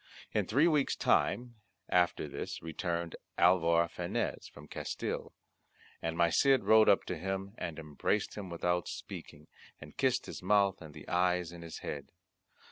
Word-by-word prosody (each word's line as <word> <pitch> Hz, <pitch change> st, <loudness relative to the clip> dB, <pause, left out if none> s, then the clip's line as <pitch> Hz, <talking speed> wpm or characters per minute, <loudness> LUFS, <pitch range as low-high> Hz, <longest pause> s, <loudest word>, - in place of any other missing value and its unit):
In -, -, +1 dB
three 140 Hz, +9 st, +4 dB
weeks 150 Hz, -4 st, +2 dB
time 120 Hz, -1 st, +1 dB, 0.3 s
after 90 Hz, -3 st, +2 dB
this 70 Hz, -, -5 dB
returned 85 Hz, 0 st, -3 dB, 0.2 s
Alvar 85 Hz, -1 st, +4 dB
Fanez -, -, -3 dB
from -, -, -13 dB
Castille. -, -, -4 dB, 0.7 s
And 80 Hz, 0 st, -2 dB
my 85 Hz, -1 st, +4 dB
Cid 135 Hz, +6 st, +4 dB
rode 110 Hz, 0 st, +6 dB
up 100 Hz, -, +5 dB
to 90 Hz, -, -3 dB
him, 95 Hz, +2 st, -3 dB
and 85 Hz, -2 st, -4 dB
embraced 80 Hz, +6 st, -1 dB
him 100 Hz, -3 st, -6 dB
without 90 Hz, +1 st, 0 dB
speaking, 75 Hz, +1 st, -8 dB, 0.3 s
and -, -, -12 dB
kissed -, -, +2 dB
his -, -, -7 dB
mouth 100 Hz, -3 st, +3 dB
and 75 Hz, -3 st, -11 dB
the -, -, -11 dB
eyes 90 Hz, -1 st, +1 dB
in 85 Hz, -1 st, -10 dB
his 85 Hz, -1 st, -8 dB
head. 70 Hz, -1 st, -5 dB
90 Hz, 155 wpm, -32 LUFS, 85-100 Hz, 0.7 s, rode